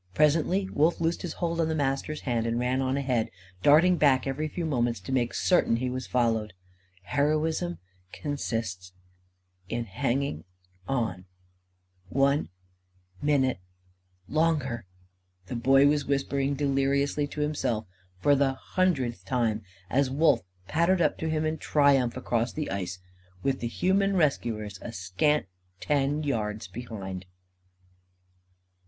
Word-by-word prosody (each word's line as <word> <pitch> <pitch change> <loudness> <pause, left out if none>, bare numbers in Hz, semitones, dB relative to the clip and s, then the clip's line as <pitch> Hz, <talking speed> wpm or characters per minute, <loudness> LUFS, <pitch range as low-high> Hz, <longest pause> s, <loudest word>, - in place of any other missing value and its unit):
Presently, 165 +6 +3
Wolf 160 +4 +2
loosed 165 +1 0
his 175 - -4
hold 170 -1 -1
on 160 - +1
the 160 - -1
Master's 145 +1 -1
hand 115 -3 -1
and 115 0 0
ran 125 +2 +1
on 130 +1 0
ahead, 125 -5 0 0.3
darting 165 - +6
back 135 -4 +4
every 140 +3 -2
few 170 +2 -4
moments 120 -7 0
to 95 - -7
make 120 -3 +1
certain 175 -10 +3
he 125 +2 -1
was 130 0 -4
followed. 115 -4 +1 0.5
"Heroism 150 - 0 0.3
consists 115 - -4 0.8
in 120 +1 -2
hanging 115 - -1 0.4
on 110 -9 -1 0.8
one 140 +4 +2 0.7
minute 135 -7 +2 0.7
longer," 150 - 0 0.6
the 110 - -5
Boy 135 +3 +5
was 145 0 +3
whispering 140 0 0
deliriously 140 +1 +1
to 150 - -5
himself 130 -7 -1 0.3
for 145 +10 +3
the 135 -1 +2
hundredth 135 -6 -1
time; 115 -4 0 0.3
as 135 +4 +2
Wolf 140 -2 +3 0.3
pattered 170 +4 +2
up - - +1
to 160 - -2
him 155 0 0
in 155 0 -1
triumph, 140 -5 +3
across 120 -1 0
the 155 - -4
ice, 95 -1 -3 0.5
with 135 -1 0
the 120 - -2
human 195 +9 +1
rescuers 110 - 0
a 120 - -6
scant 95 +10 +1 0.3
ten 145 +1 0
yards 105 -7 -2
behind. 95 -4 -7
135 Hz, 130 wpm, -28 LUFS, 115-150 Hz, 0.8 s, darting